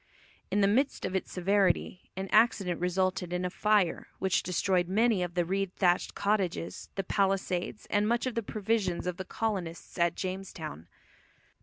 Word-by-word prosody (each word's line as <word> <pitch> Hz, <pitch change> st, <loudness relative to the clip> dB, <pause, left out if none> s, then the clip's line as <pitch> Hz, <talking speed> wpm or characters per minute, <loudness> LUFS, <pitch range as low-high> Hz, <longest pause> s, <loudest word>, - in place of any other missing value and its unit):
In 205 Hz, -, +2 dB
the 195 Hz, -, +5 dB
midst 260 Hz, +8 st, +1 dB
of 185 Hz, -, -3 dB
its 190 Hz, -, -2 dB
severity 190 Hz, -1 st, +1 dB
an 190 Hz, 0 st, -3 dB
accident 200 Hz, -6 st, +3 dB
resulted 185 Hz, 0 st, 0 dB
in 180 Hz, 0 st, -1 dB
a 180 Hz, -, -2 dB
fire 210 Hz, -3 st, +2 dB
which 190 Hz, -2 st, +1 dB
destroyed 180 Hz, 0 st, +1 dB
many 215 Hz, +1 st, +3 dB
of 175 Hz, -1 st, -3 dB
the 175 Hz, -1 st, +2 dB
reed 195 Hz, +1 st, -1 dB
thatched 180 Hz, -2 st, +2 dB
cottages, 185 Hz, -, -1 dB
the 195 Hz, -, -1 dB
palisades, 195 Hz, -1 st, 0 dB
and 205 Hz, 0 st, +2 dB
much 235 Hz, +2 st, +1 dB
of 255 Hz, -, -1 dB
the 230 Hz, -, -1 dB
provisions 205 Hz, -4 st, -1 dB
of 180 Hz, -1 st, -2 dB
the 190 Hz, -, -5 dB
colonists 185 Hz, -5 st, -4 dB
at 170 Hz, 0 st, +3 dB
Jamestown. 185 Hz, -, -5 dB
190 Hz, 165 wpm, -30 LUFS, 180-205 Hz, -, the